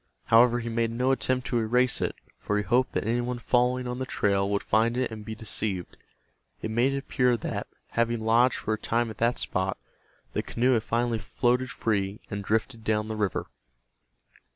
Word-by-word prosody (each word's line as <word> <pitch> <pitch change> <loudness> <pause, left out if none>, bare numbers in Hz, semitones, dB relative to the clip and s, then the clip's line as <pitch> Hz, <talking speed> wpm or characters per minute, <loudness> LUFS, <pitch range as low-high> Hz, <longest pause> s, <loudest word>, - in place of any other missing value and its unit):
However, 120 +1 +7
he 115 - -6
made 115 0 0
no 125 +3 +1
attempt 130 -1 0
to 120 - 0
erase 125 +3 +2
it, - - -1 0.2
for 105 - -1
he 105 - 0
hoped 125 +6 +2
that - - -1
any 120 +2 +1
one 125 0 -3
following 125 +1 +1
on 125 +1 -4
the 130 - -3
trail 100 -4 +1
would 100 0 0
find 115 +3 +2
it 130 -2 0
and 110 -1 -7
be 110 +1 -6
deceived. 105 -4 -3 0.6
It 110 - -4
made 120 +4 +2
it - - -1
appear 125 -3 +1
that, - - -4 0.2
having 115 0 0
lodged 120 +2 +4
for 110 - -2
a 110 - -3
time 115 0 0
at 110 - -12
that 115 +1 +2
spot, 95 +1 -1 0.6
the - - 0
canoe 125 +3 +1
had 115 - +2
finally 115 0 0
floated 125 +4 0
free 100 -2 -1
and 100 0 -3
drifted 110 +2 -1
down 110 0 0
the 110 - -3
river. 105 -3 -1
115 Hz, 200 wpm, -27 LUFS, 110-125 Hz, 0.6 s, However